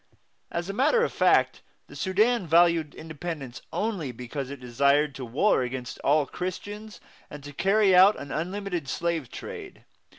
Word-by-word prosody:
As 170 +1 -3
a 195 - -4
matter 295 - +3
of - - -1
fact, - - +3 0.2
the - - -14
Sudan 210 +1 +1
valued 165 -2 +3
independence 155 -5 -7
only 195 - -2
because 125 +3 -6
it 140 -1 -7
desired 140 +4 +2
to 130 - -7
war 130 - +2
against 125 0 -5
all 145 +1 +2
Christians 205 +6 -6 0.3
and 145 -1 -10
to 145 0 -9
carry 195 +3 +3
on 190 +3 +7
an 140 - -8
unlimited 180 0 -3
slave 165 -6 -2
trade. - - -9
165 Hz, 155 wpm, -26 LUFS, 140-195 Hz, 0.3 s, on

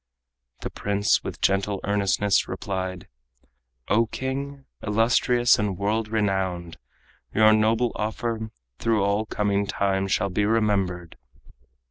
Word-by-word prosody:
The - - -5
prince 100 -2 +1
with - - -7
gentle 100 0 +1
earnestness 100 0 +1
replied: 95 -2 -4 0.8
"O 115 +2 +3
king, 135 +3 -5 0.2
illustrious 120 +3 +3
and 100 -4 -1
world 105 +3 0
renowned! 95 -5 -1 0.6
Your 110 0 +6
noble 110 +2 +2
offer 110 +1 -3 0.3
through 110 -3 +1
all 100 +2 0
coming 100 -1 0
time 95 -1 0
Shall 100 +1 0
be 105 +3 0
remembered. 100 -6 0
105 Hz, 110 wpm, -25 LUFS, 100-110 Hz, 0.8 s, Your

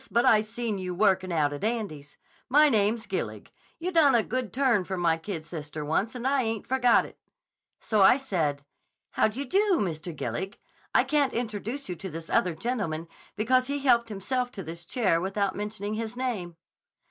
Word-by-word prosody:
But 235 - +2
I 215 - +6
seen 220 -1 -3
you 180 -1 -4
workin' 190 -2 +2
out 150 -3 +1
at 145 - -7
Andy's. 205 -11 -3 0.3
My 300 +3 +6
name's 220 0 +1
Gillig. - - -4 0.3
You 350 +2 -3
done 305 -7 +5
a 230 - +4
good 250 -3 -3
turn 250 -7 +2
for 190 +1 -4
my 170 -2 +2
kid 165 -1 -6
sister 150 -2 -6
once 200 - 0
and 250 0 -5
I 275 0 +3
ain't 225 -3 -2
forgot 250 -2 +3
it.' - - -14 0.6
So 215 -3 +1
I 195 +6 +7
said, 160 - -2 0.5
'How - - +3
do 220 +2 -6
you 280 - -2
do, 400 +3 +2
Mr. 170 -3 -3
Gillig. 190 +4 -4 0.3
I - - +4
can't 285 0 +1
introduce 230 +3 -3
you 180 - -4
to 190 - -6
this 165 0 -8
other 180 -2 +2
gentleman 170 -7 -3 0.3
because 255 +5 +2
he 285 +1 -1
helped 235 -4 +3
himself 245 +5 -2
to 195 - -6
this 165 +1 -8
chair 190 -8 +1
without 195 +1 -1
mentioning 210 0 -4
his 225 +2 -4
name. 210 -10 -3
215 Hz, 190 wpm, -27 LUFS, 175-250 Hz, 0.6 s, I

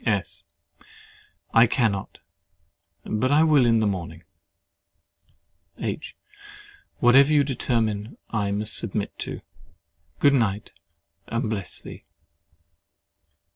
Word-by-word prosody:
S. 100 -5 -2 1.1
I 115 +1 +6
cannot—but 110 +2 -4
I 150 +2 +5
will 150 -6 +4
in 115 -1 +3
the - - +2
morning. 85 -4 -4 1.5
H. 115 +6 -5 0.8
Whatever 135 +4 +5
you 145 -1 +5
determine, 115 -5 -2
I 105 -3 -1
must 105 +1 0
submit - - -1
to. - - -6 0.8
Good 140 - +4
night, 110 -6 0 0.6
and 115 -1 -2
bless 100 -4 -4
thee! - - -11
115 Hz, 95 wpm, -24 LUFS, 100-130 Hz, 1.5 s, I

